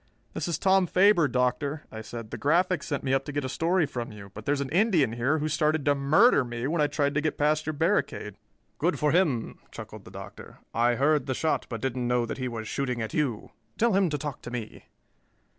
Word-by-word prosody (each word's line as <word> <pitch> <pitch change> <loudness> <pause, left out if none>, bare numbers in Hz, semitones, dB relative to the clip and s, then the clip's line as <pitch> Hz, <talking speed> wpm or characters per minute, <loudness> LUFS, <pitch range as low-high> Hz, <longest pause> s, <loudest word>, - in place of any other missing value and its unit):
"This - - -3
is 170 - -1
Tom 190 -1 +3
Faber, 185 -3 +4
Doctor," 130 +4 -1
I 110 - -7
said. 110 0 -8
"The - - -4
Graphic 175 +2 +2
sent 140 - -3
me 135 - 0
up 135 0 +2
to - - -5
get 145 -1 -2
a - - -1
story 165 +5 +1
from 120 -5 -5
you, 100 -2 -11
but 110 +1 -9
there's 145 0 +1
an 140 -1 -3
Indian 175 - +3
here 130 +6 +1
who 155 0 -1
started 155 -1 +1
to 145 - +4
murder 145 - +4
me 120 0 -5
when 155 +3 0
I 150 - +4
tried 145 -1 0
to 150 - +1
get 155 - -1
past 150 +1 +1
your 155 - -1
barricade." 160 - 0 0.5
"Good 175 +5 +1
for 150 -1 +2
him," 155 -10 +1
chuckled - - -10
the - - -11
Doctor. - - -10 0.2
"I 120 +1 +2
heard 145 +1 +2
the 130 - -1
shot, 160 +4 0
but 115 -3 -5
didn't 130 -2 -2
know 120 -1 +1
that 115 - -5
he 130 - -2
was 115 -2 -5
shooting 125 -2 -2
at 110 -1 -4
you. 135 -8 -1 0.3
Tell 235 -1 +3
him 190 -2 +3
to 150 - -1
talk 145 -3 -5
to - - -8
me." 120 -3 -7
145 Hz, 235 wpm, -27 LUFS, 125-160 Hz, 0.5 s, Faber